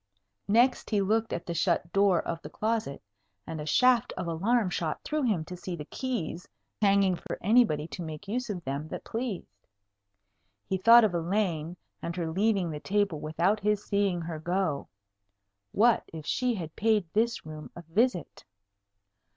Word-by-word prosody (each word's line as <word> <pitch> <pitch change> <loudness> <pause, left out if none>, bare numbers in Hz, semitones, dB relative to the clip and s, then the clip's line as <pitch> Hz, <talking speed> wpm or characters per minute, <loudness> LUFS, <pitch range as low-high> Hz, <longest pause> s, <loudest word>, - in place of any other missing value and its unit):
Next 240 +5 +3
he 210 - +2
looked 220 +3 +1
at 170 - -3
the 170 - -3
shut 170 0 0
door 195 -3 +3
of 165 0 -3
the 150 - -8
closet, 215 - -2 0.4
and 160 -1 -5
a 150 - -6
shaft 250 - +4
of - - -3
alarm 190 +5 +1
shot 160 -3 -2
through 305 0 -1
him 210 - 0
to 180 - -7
see 180 0 -5
the 150 -3 -7
keys 190 - -4 0.3
hanging 195 -2 +4
for - - -6
anybody 195 -8 +3
to 150 - -7
make 160 +2 -7
use 240 +3 -2
of 180 -5 -4
them 140 +2 -3
that - - -6
pleased. 210 - -5 1.0
He 190 -1 -2
thought 230 +4 +8
of 210 -4 +2
Elaine, 170 -2 -1 0.2
and 170 - -4
her 165 -3 -2
leaving 195 -1 +1
the 150 - -5
table 200 -2 0
without 170 +8 +1
his 210 0 0
seeing 200 -4 +1
her 165 -1 -5
go. 175 -3 -1 0.8
What 235 +3 +4
if 160 -2 -8
she 250 - 0
had 165 -5 -6
paid 215 -3 +2
this 230 0 +1
room 155 -1 -8
a 175 - -9
visit? 180 - 0
185 Hz, 170 wpm, -28 LUFS, 165-220 Hz, 1.0 s, thought